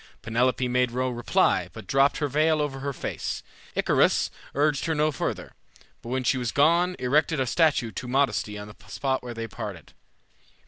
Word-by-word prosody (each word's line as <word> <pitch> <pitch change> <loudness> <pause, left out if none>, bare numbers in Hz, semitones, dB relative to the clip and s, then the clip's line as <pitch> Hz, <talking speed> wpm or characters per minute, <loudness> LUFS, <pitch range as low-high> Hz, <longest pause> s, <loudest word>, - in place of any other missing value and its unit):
Penelope 125 +2 +1
made 125 0 +2
no 130 +2 -1
reply, 120 -1 +1
but - - -9
dropped 135 +1 +3
her 150 - 0
veil 155 +3 +2
over 145 -2 -2
her 140 +1 -3
face. 135 - -4 0.3
Icarius - - +3 0.2
urged 145 0 +1
her 160 - 0
no 155 +1 +2
further, 135 - -4 0.5
but 115 - -9
when 130 +1 -1
she 130 +1 +2
was 120 -2 -2
gone 170 +5 +3
erected 150 +4 +1
a 130 - +2
statue 145 -4 +2
to 125 - -6
Modesty 110 -6 0
on 105 0 -7
the 105 - -12
spot 130 -1 -1
where 120 -1 -7
they 115 0 -4
parted. 105 -7 -8
130 Hz, 180 wpm, -26 LUFS, 120-150 Hz, 0.5 s, dropped